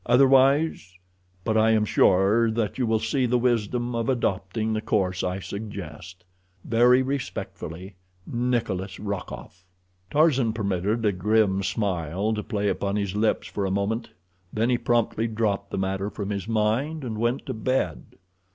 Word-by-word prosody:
Otherwise—but 110 Hz, -, +2 dB
I 110 Hz, 0 st, +4 dB
am 110 Hz, -1 st, +3 dB
sure 100 Hz, +4 st, +4 dB
that 110 Hz, +1 st, -2 dB
you 125 Hz, -, +1 dB
will 110 Hz, 0 st, +2 dB
see 125 Hz, +4 st, 0 dB
the 125 Hz, +1 st, +2 dB
wisdom 120 Hz, 0 st, 0 dB
of 115 Hz, +1 st, -1 dB
adopting 110 Hz, -2 st, -1 dB
the 110 Hz, -, -1 dB
course 95 Hz, -4 st, 0 dB
I 90 Hz, +1 st, -1 dB
suggest. 95 Hz, -3 st, -8 dB, 0.4 s
Very 125 Hz, +3 st, +4 dB
respectfully, 95 Hz, -, -5 dB, 0.3 s
NIKOLAS 115 Hz, -6 st, -2 dB
ROKOFF. 95 Hz, -3 st, -6 dB, 0.5 s
Tarzan 140 Hz, -7 st, +3 dB
permitted 105 Hz, +1 st, -1 dB
a 105 Hz, -, +4 dB
grim 100 Hz, +1 st, +2 dB
smile 95 Hz, 0 st, -1 dB
to 105 Hz, -, -2 dB
play 105 Hz, -2 st, -2 dB
about 100 Hz, 0 st, -1 dB
his 100 Hz, -2 st, -2 dB
lips 110 Hz, +1 st, +1 dB
for 100 Hz, -, -4 dB
a 95 Hz, -, 0 dB
moment, 100 Hz, +4 st, -1 dB, 0.4 s
then 115 Hz, +3 st, +1 dB
he 120 Hz, -, +3 dB
promptly 115 Hz, -1 st, +1 dB
dropped 105 Hz, -3 st, -1 dB
the -, -, -4 dB
matter 95 Hz, +1 st, -1 dB
from 105 Hz, -1 st, -5 dB
his 100 Hz, -1 st, -3 dB
mind, 115 Hz, +8 st, 0 dB
and 110 Hz, -4 st, -4 dB
went 120 Hz, +3 st, 0 dB
to -, -, -3 dB
bed. 110 Hz, -6 st, -2 dB
110 Hz, 150 wpm, -25 LUFS, 95-120 Hz, 0.5 s, I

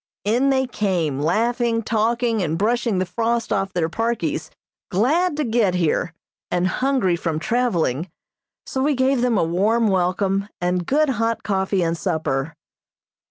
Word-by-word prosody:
In 245 Hz, +6 st, +2 dB
they 265 Hz, -1 st, +2 dB
came, 180 Hz, -, -1 dB
laughing, 230 Hz, -, +1 dB
talking 230 Hz, +1 st, 0 dB
and 160 Hz, -2 st, -1 dB
brushing 230 Hz, +1 st, +1 dB
the 185 Hz, -, +1 dB
frost 230 Hz, +4 st, -1 dB
off 195 Hz, -1 st, -1 dB
their 175 Hz, -3 st, 0 dB
parkies, 230 Hz, +7 st, -2 dB, 0.4 s
glad 295 Hz, -, +1 dB
to 305 Hz, -, +1 dB
get 225 Hz, -6 st, +1 dB
here, 165 Hz, 0 st, 0 dB, 0.3 s
and 180 Hz, 0 st, 0 dB
hungry 255 Hz, -3 st, +1 dB
from 165 Hz, -2 st, -2 dB
traveling, 175 Hz, -, 0 dB, 0.6 s
so 265 Hz, -, -3 dB
we 290 Hz, +1 st, +2 dB
gave 260 Hz, 0 st, +2 dB
them 245 Hz, -3 st, +2 dB
a -, -, +3 dB
warm 210 Hz, +7 st, +2 dB
welcome, 190 Hz, +2 st, 0 dB
and 180 Hz, 0 st, -1 dB
good 300 Hz, +2 st, +2 dB
hot 230 Hz, -2 st, -1 dB
coffee 190 Hz, -1 st, 0 dB
and 165 Hz, 0 st, 0 dB
supper. 155 Hz, -1 st, -2 dB
210 Hz, 150 wpm, -22 LUFS, 180-240 Hz, 0.6 s, a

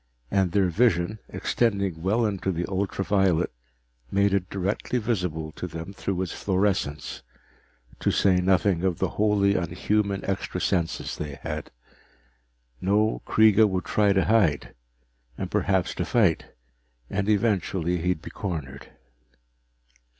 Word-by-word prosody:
And 95 Hz, -3 st, +2 dB
their 95 Hz, -1 st, +2 dB
vision, 105 Hz, 0 st, +1 dB
extending 100 Hz, -8 st, 0 dB
well 105 Hz, +6 st, +1 dB
into 95 Hz, -2 st, -1 dB
the 85 Hz, 0 st, -2 dB
ultra 95 Hz, 0 st, -2 dB
violet, 95 Hz, -4 st, +2 dB, 0.6 s
made 100 Hz, 0 st, +2 dB
it 95 Hz, -2 st, 0 dB
directly 100 Hz, +6 st, -2 dB
visible 90 Hz, -9 st, -2 dB
to 90 Hz, -, -6 dB
them 85 Hz, +3 st, -7 dB
through 95 Hz, -2 st, -2 dB
its 90 Hz, -, -5 dB
fluorescence 95 Hz, -7 st, -1 dB, 0.8 s
to -, -, +1 dB
say 95 Hz, -2 st, +3 dB
nothing 95 Hz, -1 st, +2 dB
of 90 Hz, -3 st, +1 dB
the -, -, 0 dB
wholly 105 Hz, -2 st, +2 dB
unhuman 100 Hz, +3 st, -1 dB
extra 95 Hz, -1 st, -2 dB
senses 85 Hz, -3 st, -1 dB
they 75 Hz, -2 st, -5 dB
had. -, -, -4 dB, 1.1 s
No, 105 Hz, +3 st, +1 dB
Kreega 110 Hz, 0 st, +5 dB
would 90 Hz, -2 st, -2 dB
try 105 Hz, +2 st, +2 dB
to 95 Hz, -1 st, +2 dB
hide, 95 Hz, -, +2 dB, 0.6 s
and -, -, -4 dB
perhaps 95 Hz, -2 st, +1 dB
to 90 Hz, -, -2 dB
fight, 100 Hz, -4 st, +2 dB, 0.6 s
and 100 Hz, -, -2 dB
eventually 95 Hz, -5 st, +1 dB
he'd 90 Hz, -1 st, -1 dB
be -, -, -8 dB
cornered. 75 Hz, -9 st, -5 dB
95 Hz, 130 wpm, -25 LUFS, 90-100 Hz, 1.1 s, Kreega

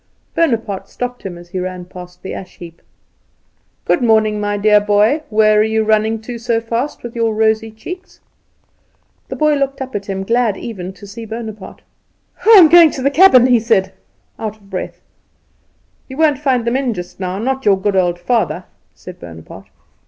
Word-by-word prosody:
Bonaparte 230 Hz, -, -1 dB
stopped 245 Hz, 0 st, -5 dB
him 180 Hz, -3 st, -7 dB
as 175 Hz, 0 st, -14 dB
he 185 Hz, +1 st, -4 dB
ran 180 Hz, 0 st, -5 dB
past 180 Hz, 0 st, -12 dB
the 190 Hz, -, -6 dB
ash 185 Hz, -, -9 dB
heap. 170 Hz, -1 st, -12 dB, 1.0 s
"Good -, -, +1 dB
morning, 215 Hz, -2 st, +2 dB
my 205 Hz, 0 st, -1 dB
dear 210 Hz, 0 st, +4 dB
boy. 210 Hz, +8 st, +2 dB
Where 215 Hz, -1 st, +3 dB
are -, -, +5 dB
you 220 Hz, 0 st, 0 dB
running 220 Hz, +1 st, +1 dB
to 235 Hz, +1 st, -7 dB
so 230 Hz, -1 st, 0 dB
fast 230 Hz, +5 st, -4 dB
with 240 Hz, -1 st, -8 dB
your 225 Hz, -2 st, 0 dB
rosy 220 Hz, 0 st, +1 dB
cheeks?" 360 Hz, -, -10 dB, 1.1 s
The -, -, -6 dB
boy 305 Hz, -1 st, +2 dB
looked 275 Hz, -1 st, -1 dB
up 265 Hz, -1 st, -6 dB
at 200 Hz, -1 st, -5 dB
him, 195 Hz, -1 st, -3 dB
glad 230 Hz, -1 st, +1 dB
even 190 Hz, -6 st, -7 dB
to 190 Hz, +2 st, -14 dB
see 220 Hz, +3 st, -9 dB
Bonaparte. 220 Hz, -3 st, -8 dB, 0.6 s
"I -, -, +2 dB
am 350 Hz, -4 st, +9 dB
going 335 Hz, 0 st, +7 dB
to 260 Hz, -, -5 dB
the 280 Hz, -, +2 dB
cabin," 285 Hz, -7 st, +6 dB
he 250 Hz, -2 st, +4 dB
said, 195 Hz, -4 st, +1 dB, 0.5 s
out 215 Hz, -1 st, -5 dB
of 200 Hz, -2 st, -23 dB
breath. 185 Hz, -, -6 dB, 1.1 s
"You 265 Hz, -, -9 dB
won't 305 Hz, -4 st, +2 dB
find 260 Hz, -5 st, 0 dB
them 235 Hz, +1 st, 0 dB
in 255 Hz, -4 st, -1 dB
just 180 Hz, 0 st, -8 dB
now 185 Hz, 0 st, -3 dB
not 265 Hz, +5 st, -2 dB
your 195 Hz, -4 st, +3 dB
good 200 Hz, 0 st, -1 dB
old 175 Hz, -2 st, +1 dB
father," 180 Hz, -3 st, -1 dB, 0.3 s
said 180 Hz, -1 st, -12 dB
Bonaparte. 80 Hz, -2 st, -12 dB
220 Hz, 185 wpm, -17 LUFS, 195-245 Hz, 1.1 s, am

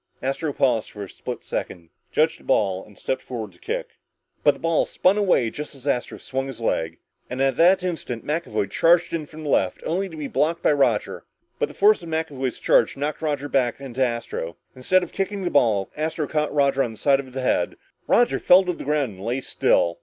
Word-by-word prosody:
Astro 135 Hz, +4 st, -1 dB
paused 125 Hz, -7 st, 0 dB
a 100 Hz, -1 st, -5 dB
split -, -, -7 dB
second, 85 Hz, -2 st, -5 dB, 0.2 s
judged 155 Hz, +1 st, +2 dB
the -, -, -19 dB
ball 95 Hz, -7 st, +1 dB
and 105 Hz, -3 st, -18 dB
stepped 130 Hz, -, -2 dB
forward 110 Hz, -5 st, -6 dB
to 90 Hz, -, -23 dB
kick. -, -, -3 dB, 0.5 s
But 145 Hz, -1 st, +5 dB
the -, -, -14 dB
ball 165 Hz, -1 st, +1 dB
spun 185 Hz, +2 st, +3 dB
away, 185 Hz, -, +2 dB
just 150 Hz, +2 st, -7 dB
as 135 Hz, -1 st, -14 dB
Astro 125 Hz, -4 st, -1 dB
swung 135 Hz, 0 st, -3 dB
his 130 Hz, -4 st, -8 dB
leg. 80 Hz, -7 st, -1 dB, 0.3 s
And 125 Hz, -, -5 dB
at 135 Hz, 0 st, +2 dB
that 180 Hz, +3 st, +5 dB
instant, 160 Hz, -10 st, -4 dB
McAvoy 150 Hz, -9 st, -1 dB
came 100 Hz, -, -8 dB
charging 170 Hz, -, +3 dB
in -, -, -8 dB
from 155 Hz, +1 st, -10 dB
the 150 Hz, -, -4 dB
left, 95 Hz, -8 st, +1 dB
only 190 Hz, +3 st, -1 dB
to 160 Hz, -, -10 dB
be 150 Hz, -2 st, -4 dB
blocked 165 Hz, +4 st, 0 dB
by -, -, +4 dB
Roger. 125 Hz, -7 st, +1 dB, 0.4 s
But -, -, 0 dB
the -, -, -12 dB
force 210 Hz, 0 st, +5 dB
of 170 Hz, -, -9 dB
McAvoy's 145 Hz, -5 st, -2 dB
charge 115 Hz, -, +3 dB
knocked 145 Hz, +3 st, -3 dB
Roger 145 Hz, -2 st, -1 dB
back 130 Hz, -4 st, +1 dB
into 130 Hz, -1 st, -2 dB
Astro. 115 Hz, -9 st, -3 dB, 0.2 s
Instead 180 Hz, +9 st, +2 dB
of 175 Hz, -, -7 dB
kicking 195 Hz, 0 st, -2 dB
the 175 Hz, -, -1 dB
ball, 110 Hz, -8 st, +2 dB
Astro 155 Hz, 0 st, -2 dB
caught 150 Hz, -1 st, -1 dB
Roger 140 Hz, -2 st, +2 dB
on 120 Hz, -4 st, -1 dB
the -, -, -13 dB
side 140 Hz, +2 st, +3 dB
of 135 Hz, -2 st, -7 dB
the 130 Hz, +1 st, -4 dB
head. 90 Hz, -8 st, +1 dB, 0.3 s
Roger 240 Hz, -, +3 dB
fell 185 Hz, +2 st, +6 dB
to 180 Hz, -1 st, -1 dB
the -, -, -8 dB
ground 145 Hz, -4 st, 0 dB
and 95 Hz, -, -10 dB
lay 120 Hz, +4 st, -1 dB
still. 85 Hz, -8 st, +1 dB
140 Hz, 220 wpm, -23 LUFS, 120-160 Hz, 0.5 s, fell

